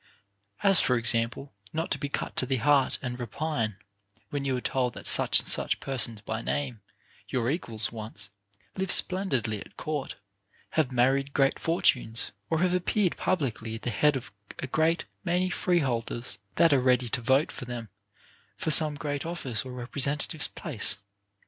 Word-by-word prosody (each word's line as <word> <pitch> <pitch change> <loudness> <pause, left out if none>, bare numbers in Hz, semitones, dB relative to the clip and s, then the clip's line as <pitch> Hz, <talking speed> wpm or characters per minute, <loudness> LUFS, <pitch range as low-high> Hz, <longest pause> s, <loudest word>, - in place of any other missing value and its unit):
As, 195 -3 +6
for 125 - +2
example, 115 +4 +1 0.2
not 160 +2 -2
to - - +1
be 145 - -3
cut - - -4
to 130 - +2
the 135 - +1
heart 140 +1 +3
and 125 -1 -4
repine, 120 -2 -2 0.6
when 140 -1 -2
you 130 -2 0
are - - -2
told 125 -1 -1
that - - -9
such - - +6
and - - -6
such - - +2
persons 120 -5 -1
by 110 +2 -4
name, 130 -5 -3 0.5
your 125 0 0
equals 115 -9 -1
once, 105 -3 -7 0.4
live 190 -1 -1
splendidly 135 - +3
at - - -13
court, 150 -3 -4 0.6
have 155 -5 +1
married 135 +3 +1
great 135 -1 +2
fortunes, 125 -8 +1 0.2
or 160 0 +1
have 180 -1 +2
appeared 180 +1 +1
publicly 120 -10 -2
at 115 - -9
the 120 - -1
head 150 +6 +3
of 130 -2 -6 0.3
a - - -4
great 160 +5 +1 0.2
many 180 +1 0
freeholders, 120 - -1 0.2
that 165 -3 +5
are 140 - +4
ready 125 -1 +2
to 120 - -1
vote 135 +6 +2
for - - -7
them 120 -3 -6 0.7
for 160 - 0
some 155 -1 +6
great 145 -1 -3
office 155 -9 -3
or 130 - -8
representative's 140 +5 -1
place. 135 -13 -1
135 Hz, 170 wpm, -28 LUFS, 120-155 Hz, 0.7 s, As